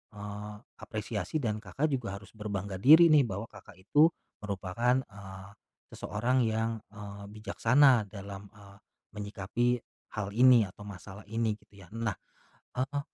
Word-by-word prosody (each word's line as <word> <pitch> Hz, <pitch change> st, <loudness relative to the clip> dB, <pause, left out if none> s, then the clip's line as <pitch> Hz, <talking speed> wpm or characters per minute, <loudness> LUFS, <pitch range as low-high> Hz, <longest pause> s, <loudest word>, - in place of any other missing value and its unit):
eee, 105 Hz, 0 st, -7 dB, 0.2 s
apresiasi 110 Hz, -, -3 dB
dan 110 Hz, -1 st, -1 dB
Kakak, 110 Hz, -, -2 dB
juga 115 Hz, -8 st, -2 dB
harus 100 Hz, +1 st, -12 dB
berbangga 100 Hz, -3 st, -4 dB
diri 160 Hz, -, +8 dB
nih 145 Hz, -3 st, +6 dB
bahwa 100 Hz, +2 st, -5 dB
Kakak, -, -, -14 dB
itu 145 Hz, +11 st, +5 dB, 0.4 s
merupakan, 105 Hz, +6 st, 0 dB
eee, 95 Hz, -2 st, -10 dB, 0.4 s
seseorang 120 Hz, +4 st, 0 dB
yang, 110 Hz, +1 st, 0 dB, 0.2 s
eee, 100 Hz, -1 st, -9 dB
bijaksana 125 Hz, +2 st, +4 dB
dalam, 100 Hz, 0 st, -9 dB
eee, 100 Hz, -1 st, -16 dB, 0.4 s
menyikapi 105 Hz, +4 st, -1 dB, 0.3 s
hal 105 Hz, -2 st, -3 dB
ini 125 Hz, -5 st, +6 dB
atau 105 Hz, +2 st, -13 dB
masalah 100 Hz, 0 st, -10 dB
ini 110 Hz, 0 st, -1 dB
gitu 100 Hz, -2 st, -19 dB
ya 90 Hz, -, -15 dB
nah, 115 Hz, 0 st, -2 dB, 0.7 s
eee, 140 Hz, +2 st, -1 dB
105 Hz, 135 wpm, -30 LUFS, 100-120 Hz, 0.7 s, diri